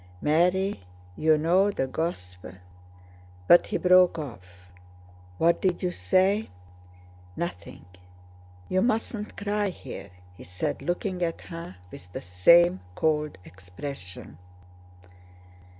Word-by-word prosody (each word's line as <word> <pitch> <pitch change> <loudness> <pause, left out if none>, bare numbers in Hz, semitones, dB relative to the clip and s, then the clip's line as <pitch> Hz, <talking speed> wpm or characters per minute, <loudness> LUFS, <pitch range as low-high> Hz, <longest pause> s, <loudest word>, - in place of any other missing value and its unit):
"Mary, 180 - +2 0.4
you 155 +6 +3
know 180 +6 +3
the 165 -9 -1
Gosp..." 90 - -4 1.0
but 175 - +7
he - - -1
broke 180 -1 +5
off. 90 - -10 0.7
"What 170 +1 +2
did 185 0 0
you 180 - 0
say?" 185 - +1 0.9
"Nothing. 135 - -6 0.8
You 185 0 +1
mustn't 220 -1 -2
cry 205 0 -1
here," 130 - -9 0.3
he - - -12
said, 90 0 -4
looking 180 +1 -2
at 165 -1 -2
her 165 - -9 0.2
with 90 0 -12
the - - -5
same 95 - +5 0.2
cold 150 - 0
expression. 90 - -9
165 Hz, 105 wpm, -26 LUFS, -, 1.0 s, but